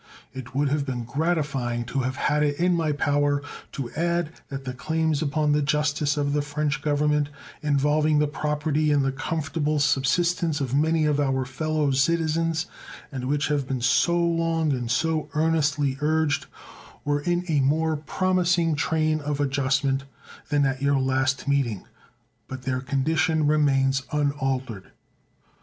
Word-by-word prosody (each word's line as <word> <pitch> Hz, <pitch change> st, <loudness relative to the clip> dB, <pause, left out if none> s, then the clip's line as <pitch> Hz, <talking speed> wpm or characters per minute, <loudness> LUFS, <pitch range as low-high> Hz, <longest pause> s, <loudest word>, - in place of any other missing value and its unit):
It 130 Hz, 0 st, -9 dB
would 140 Hz, 0 st, +2 dB
have 145 Hz, +1 st, 0 dB
been 125 Hz, -3 st, -4 dB
gratifying 135 Hz, -4 st, -1 dB
to 135 Hz, -, -2 dB
have 130 Hz, 0 st, -1 dB
had 150 Hz, +2 st, +1 dB
it 145 Hz, 0 st, 0 dB
in 180 Hz, +1 st, +3 dB
my 165 Hz, -3 st, +1 dB
power 145 Hz, 0 st, +1 dB, 0.3 s
to 125 Hz, -4 st, -5 dB
add 170 Hz, 0 st, -1 dB, 0.2 s
that 135 Hz, -1 st, -6 dB
the 130 Hz, -, -4 dB
claims 160 Hz, +2 st, -1 dB
upon 150 Hz, 0 st, +1 dB
the 150 Hz, 0 st, +2 dB
justice 150 Hz, 0 st, 0 dB
of 145 Hz, -1 st, 0 dB
the 150 Hz, -, +1 dB
French 145 Hz, 0 st, -2 dB
Government, 150 Hz, 0 st, +1 dB, 0.3 s
involving 150 Hz, +1 st, +2 dB
the 150 Hz, -, +3 dB
property 150 Hz, 0 st, 0 dB
and 145 Hz, -2 st, +2 dB
the 135 Hz, -, +1 dB
comfortable 150 Hz, +1 st, -2 dB
subsistence 155 Hz, +3 st, +1 dB
of 135 Hz, -3 st, -3 dB
many 155 Hz, +2 st, +2 dB
of 150 Hz, -1 st, +1 dB
our 135 Hz, -2 st, +1 dB
fellow 150 Hz, +2 st, -1 dB
citizens, 165 Hz, +3 st, +1 dB, 0.5 s
and 130 Hz, -3 st, -5 dB
which 145 Hz, +2 st, 0 dB
have 145 Hz, -3 st, 0 dB
been 130 Hz, -1 st, -2 dB
so 125 Hz, +8 st, +3 dB
long 165 Hz, -2 st, +1 dB
and 125 Hz, -3 st, -2 dB
so 155 Hz, +4 st, 0 dB
earnestly 150 Hz, -3 st, +1 dB
urged, 155 Hz, 0 st, +1 dB, 0.6 s
were 145 Hz, 0 st, +1 dB
in 175 Hz, +3 st, 0 dB
a 155 Hz, -4 st, +2 dB
more 155 Hz, +4 st, +2 dB
promising 175 Hz, +1 st, +1 dB
train 155 Hz, +1 st, +1 dB
of 145 Hz, 0 st, -3 dB
adjustment 135 Hz, -1 st, 0 dB, 0.4 s
than 145 Hz, -1 st, +2 dB
at 135 Hz, 0 st, -1 dB
your 140 Hz, 0 st, +2 dB
last 130 Hz, +1 st, 0 dB
meeting; 135 Hz, -8 st, 0 dB, 0.6 s
but 130 Hz, -1 st, -7 dB
their 130 Hz, -1 st, -1 dB
condition 155 Hz, +4 st, +1 dB
remains 135 Hz, -3 st, +2 dB
unaltered. 135 Hz, -8 st, -2 dB
145 Hz, 150 wpm, -25 LUFS, 135-155 Hz, 0.6 s, in